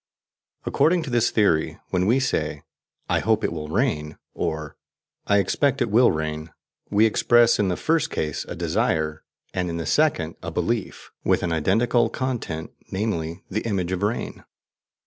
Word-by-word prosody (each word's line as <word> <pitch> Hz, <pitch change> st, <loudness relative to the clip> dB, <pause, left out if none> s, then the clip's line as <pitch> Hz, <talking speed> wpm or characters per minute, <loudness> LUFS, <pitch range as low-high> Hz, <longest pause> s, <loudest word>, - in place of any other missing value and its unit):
According 170 Hz, +1 st, +2 dB
to 140 Hz, -, -6 dB
this 120 Hz, -1 st, +3 dB
theory, 95 Hz, -8 st, +2 dB
when 90 Hz, 0 st, +1 dB
we 120 Hz, +5 st, +4 dB
say: 130 Hz, -, -1 dB, 0.4 s
"I -, -, +2 dB
hope 110 Hz, +1 st, +1 dB
it -, -, 0 dB
will 75 Hz, -2 st, -5 dB
rain," 80 Hz, -, -1 dB, 0.2 s
or 80 Hz, -2 st, -3 dB, 0.5 s
"I 100 Hz, -, +4 dB
expect 135 Hz, +8 st, +1 dB
it 120 Hz, -5 st, 0 dB
will 120 Hz, +3 st, +6 dB
rain," 80 Hz, 0 st, -3 dB, 0.4 s
we 105 Hz, +2 st, +4 dB
express, 120 Hz, +1 st, +4 dB
in 105 Hz, -, +2 dB
the 90 Hz, -, -1 dB
first 160 Hz, -1 st, +1 dB
case, 75 Hz, -2 st, -2 dB
a -, -, -6 dB
desire, 80 Hz, -3 st, 0 dB, 0.3 s
and 90 Hz, -1 st, -1 dB
in 85 Hz, -, -3 dB
the 85 Hz, -, -3 dB
second, 115 Hz, -, +1 dB
a 85 Hz, -, -4 dB
belief, 95 Hz, +6 st, -3 dB
with -, -, +2 dB
an 85 Hz, -, -1 dB
identical 110 Hz, +8 st, +2 dB
content, 120 Hz, -12 st, -3 dB, 0.2 s
namely, 95 Hz, -4 st, -3 dB
the 110 Hz, +3 st, -1 dB
image 95 Hz, -6 st, -2 dB
of 95 Hz, 0 st, -2 dB
rain. 105 Hz, +3 st, -2 dB
100 Hz, 165 wpm, -24 LUFS, 80-120 Hz, 0.5 s, will